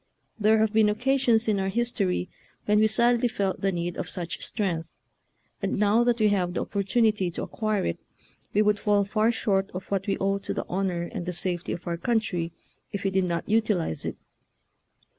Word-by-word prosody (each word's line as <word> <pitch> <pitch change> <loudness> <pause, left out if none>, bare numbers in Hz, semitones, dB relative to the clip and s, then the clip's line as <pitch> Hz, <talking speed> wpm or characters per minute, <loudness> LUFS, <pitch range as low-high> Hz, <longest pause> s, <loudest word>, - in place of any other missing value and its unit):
There 215 +1 +4
have 220 0 +2
been 215 -1 +5
occasions 245 0 +2
in 210 -2 +2
our 190 0 0
history 200 -5 0 0.4
when 210 0 +3
we 220 - +5
sadly 235 +2 +3
felt 200 -5 -2
the 195 - +2
need 175 -1 -3
of - - -4
such 175 -2 -3
strength, 175 -7 -1 0.7
and - - -1
now 210 +3 +4
that 240 -1 +2
we 215 -2 +3
have 180 -3 0
the - - 0
opportunity 210 -1 +1
to 170 - -5
acquire 215 -3 -1
it, 85 - -2 0.5
we 210 - +3
would 210 0 +2
fall 205 -1 +3
far 215 +3 +2
short 195 -4 0
of 185 +2 -7
what 195 +1 -1
we 195 - 0
owe 195 +1 0
to 200 +1 -4
the - - -3
honor 180 -2 -1
and 175 +1 -6
the 180 - -2
safety 175 0 -2
of 170 - -5
our 170 -1 -2
country 180 -6 -1 0.4
if 200 - -4
we 195 - +1
did 190 -1 +2
not 170 -1 -2
utilize 210 - +1
it. - - -4
200 Hz, 200 wpm, -26 LUFS, 185-220 Hz, 0.7 s, been